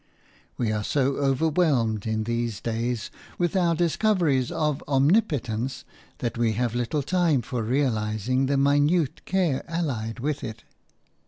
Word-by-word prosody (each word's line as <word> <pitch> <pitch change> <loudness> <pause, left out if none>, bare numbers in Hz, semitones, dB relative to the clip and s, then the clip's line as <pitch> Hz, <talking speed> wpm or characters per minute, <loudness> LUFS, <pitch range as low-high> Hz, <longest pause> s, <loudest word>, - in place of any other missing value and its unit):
We 115 -3 0
are 105 -1 -1
so 135 +3 +1
overwhelmed, 135 - +1
in 110 0 0
these 115 -1 -2
days, 115 0 -2 0.3
with 175 0 0
our 175 -3 +3
discoveries 170 - +1
of 150 -2 -1
omnipotence 135 - +1 0.3
that 120 -1 -3
we 115 -2 +2
have 120 0 -1
little 120 +5 -1
time 170 -6 +2
for 125 +1 -3
realizing 120 0 0
the 140 0 +1
minute 145 +3 +2
care 180 -8 0
allied 130 -9 -3
with 145 +3 -2
it. 115 -2 -7
135 Hz, 135 wpm, -25 LUFS, 115-155 Hz, 0.3 s, our